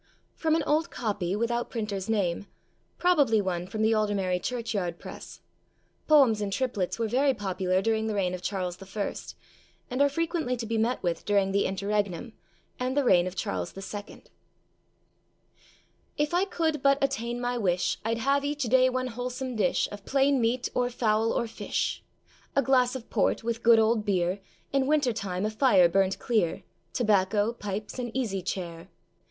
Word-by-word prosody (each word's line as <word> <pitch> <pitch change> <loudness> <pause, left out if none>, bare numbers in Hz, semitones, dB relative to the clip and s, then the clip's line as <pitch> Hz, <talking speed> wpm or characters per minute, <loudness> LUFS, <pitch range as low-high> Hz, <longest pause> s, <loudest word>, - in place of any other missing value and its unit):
[FROM 320 -1 +1
an 325 - +1
old 310 +3 +1
copy, 200 -5 -2
without 235 +2 -1
printer's 210 -4 -4
name; 200 -3 0 0.5
probably 290 -11 +3
one 180 -3 -2
from 215 +3 -2
the 220 +1 +4
Aldermary 200 -4 0
Church 235 -2 -3
yard 175 -4 -2
press. - - -10 0.7
Poems 265 -9 +5
in 205 - -1
triplets 205 -4 -1
were 230 -1 0
very 265 +4 +2
popular 190 -2 -1
during 220 0 +1
the 215 - -2
reign 185 -3 0
of 180 - -5
Charles 185 -1 -3
I., 195 +1 -4 0.8
and 255 +2 0
are 285 - +5
frequently 320 -4 -1
to 230 - -4
be 225 0 -1
met 235 +3 0
with 175 -2 -1
during 200 -2 +2
the 200 +1 +2
Interregnum, 200 +2 -2 0.5
and 255 +2 -1
the 285 - +4
reign 185 -7 +4
of 185 - -6
Charles 95 - -3
II.] 205 +1 -8 1.9
IF 295 +1 0
I 360 +2 +3
could 320 -6 -1
but 275 0 +4
attain 245 -3 -1
my 245 0 -1
wish, 185 -3 0
I'd 225 +1 0
have 275 +4 +1
each 290 0 -2
day 255 +2 +4
one 255 0 -1
wholesome 250 +1 -4
dish, 245 +5 +1
Of 205 -1 -8
plain 275 +1 +2
meat, 240 +2 +1
or 245 0 +1
fowl, 225 -2 +1
or 235 - 0
fish. 225 - -3 0.5
A 275 - +3
glass 255 -1 +3
of 250 -3 -8
port, - - +1
with 230 0 -2
good 230 0 +6
old 220 0 +3
beer, 185 -2 0 0.3
In 270 -1 +2
winter 290 -5 +2
time 195 -3 -3
a 215 - -1
fire 215 -6 +5
burnt 195 +2 +1
clear, 215 -9 0 0.3
Tobacco, 210 -1 +2
pipes, 210 +1 -5
an 240 -1 -3
easy 205 -7 -1
chair. 175 -1 -5
225 Hz, 170 wpm, -27 LUFS, 195-255 Hz, 1.9 s, good